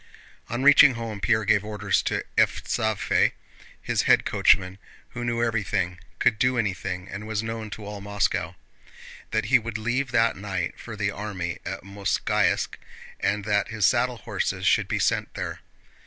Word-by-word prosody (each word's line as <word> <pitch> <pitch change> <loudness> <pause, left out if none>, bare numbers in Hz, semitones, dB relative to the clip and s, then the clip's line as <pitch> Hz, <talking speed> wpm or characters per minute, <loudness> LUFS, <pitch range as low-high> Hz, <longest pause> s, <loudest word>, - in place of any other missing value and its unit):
On 120 +3 -2
reaching 145 -2 +8
home 115 -3 -5
Pierre 110 +1 +1
gave 100 0 +3
orders 105 -2 0
to - - -2
Evstáfey—his 110 -2 0
head - - +4
coachman 95 +1 +3 0.3
who 120 - -6
knew 120 -1 0
everything, 100 -6 -1 0.2
could 105 - +2
do 125 0 +2
anything, 95 -4 -2
and 105 +3 -7
was 110 0 -2
known 115 -1 -5
to 105 0 -8
all 105 0 -7
Moscow—that 105 +1 -4
he 120 - +5
would 115 -1 -5
leave 120 +5 -1
that 115 -2 +2
night 95 -3 -4
for 110 - -8
the 105 -1 -1
army 95 -4 -5
at - - -5
Mozháysk, 100 0 0 0.4
and 100 0 0
that 105 -1 +1
his 110 -3 0
saddle 125 +3 +2
horses - - -3
should - - +3
be - - -1
sent - - 0
there. - - -4
105 Hz, 155 wpm, -25 LUFS, 100-115 Hz, 0.4 s, reaching